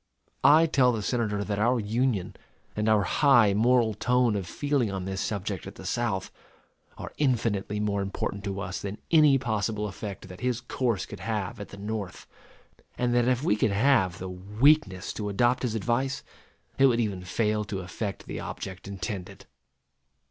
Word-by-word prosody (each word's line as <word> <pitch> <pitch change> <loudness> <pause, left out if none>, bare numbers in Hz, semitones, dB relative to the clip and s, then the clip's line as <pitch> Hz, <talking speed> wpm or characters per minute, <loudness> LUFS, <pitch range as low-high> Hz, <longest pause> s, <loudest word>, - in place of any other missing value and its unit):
I 150 +4 +7
tell 135 -6 +3
the 110 -3 -3
Senator 105 -3 -1
that 100 -1 -2
our 120 +3 +3
Union, 110 -2 -1 0.4
and 105 +1 0
our 105 -2 +4
high 120 -1 +4
moral 115 +1 +3
tone 125 +1 +2
of 95 -3 -3
feeling 140 0 0
on 95 -2 -4
this 95 0 -3
subject 100 -3 -3
at - - -9
the - - -11
South, 110 -6 -1 0.7
are - - -8
infinitely 115 -7 0
more 100 -1 0
important 100 +1 -3
to 100 -1 -3
us 90 -1 -4
than 100 +1 -5
any 150 -4 +6
possible 110 -3 -1
effect 100 -1 -7
that 90 0 -11
his 125 -2 0
course 125 -5 -1
could - - -9
have 110 +2 -3
at 100 - -7
the 100 - -10
North; 105 -2 -5 0.7
and 125 -1 +1
that 120 0 +3
if 130 +1 +1
we 105 - +3
could 105 - +2
have 105 -5 +3
the 95 - -6
weakness 100 +3 +2
to 105 -1 -4
adopt 120 +5 +2
his 120 -3 -1
advice, 120 +5 -1 0.6
it 135 - +7
would 120 -2 +2
even 100 -5 -1
fail 105 +3 0
to 100 -2 -4
effect 100 +3 -5
the - - -5
object 95 0 -7
intended. 95 -1 -6
105 Hz, 175 wpm, -27 LUFS, 100-125 Hz, 0.7 s, I